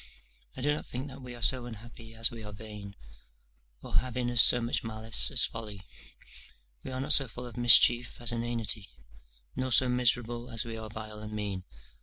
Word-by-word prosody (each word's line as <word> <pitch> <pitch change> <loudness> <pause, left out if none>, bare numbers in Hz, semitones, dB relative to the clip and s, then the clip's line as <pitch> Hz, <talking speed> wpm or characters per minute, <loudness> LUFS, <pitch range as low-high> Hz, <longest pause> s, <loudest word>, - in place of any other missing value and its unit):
I - - -6
do 145 +1 +2
not 150 - -6
think 130 +4 -6
that 135 +1 -11
we 125 -1 -9
are 120 - -9
so 125 +2 +4
unhappy 115 0 -12
as 115 0 0
we 115 -2 -9
are 105 - -8
vain, 105 -2 -10 0.9
or - - -2
have 125 -1 -1
in 120 -1 -1
us 120 0 +7
so 125 - +8
much 120 0 -2
malice 110 0 0
as 125 -5 +4
folly; 105 -4 -7 1.0
we - - -7
are 130 0 -5
not 145 +3 +2
so 135 -2 +3
full 125 +1 -8
of 120 - -10
mischief 120 0 +5
as 120 -1 0
inanity; 115 -3 -3 0.7
nor 130 0 -3
so 130 +2 +4
miserable 120 -1 0
as 115 +1 -2
we 115 -1 -6
are 110 -1 -7
vile 110 0 -8
and 105 0 -8
mean. 100 -3 -5
120 Hz, 200 wpm, -29 LUFS, 110-125 Hz, 1.0 s, so